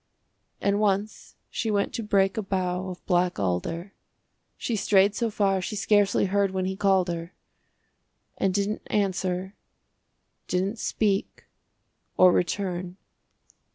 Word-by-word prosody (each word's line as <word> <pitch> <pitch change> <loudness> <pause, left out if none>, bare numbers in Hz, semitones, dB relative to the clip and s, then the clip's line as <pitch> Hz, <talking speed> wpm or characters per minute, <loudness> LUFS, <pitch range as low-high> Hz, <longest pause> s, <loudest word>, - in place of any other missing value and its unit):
And 200 0 +1
once 205 0 -1 0.2
she 225 - -2
went 205 -1 0
to - - -3
break 195 -2 +2
a 220 - -1
bough 185 -1 -2
Of 180 - -9
black 180 -1 +1
alder. 165 - -2 0.6
She 235 - -2
strayed 200 -1 +4
so 230 +1 -1
far 195 -3 +1
she 210 - -4
scarcely 205 0 +3
heard 200 +1 +2
When 185 0 -2
he 190 0 -2
called 190 -2 +2
her 170 0 -5 1.0
And 195 - +1
didn't 200 +2 -1
answer 190 -2 -1 0.9
didn't 195 +5 -1
speak 205 -3 -1 0.7
Or 185 -1 +7
return. 180 0 -1
195 Hz, 125 wpm, -26 LUFS, 180-205 Hz, 1.0 s, Or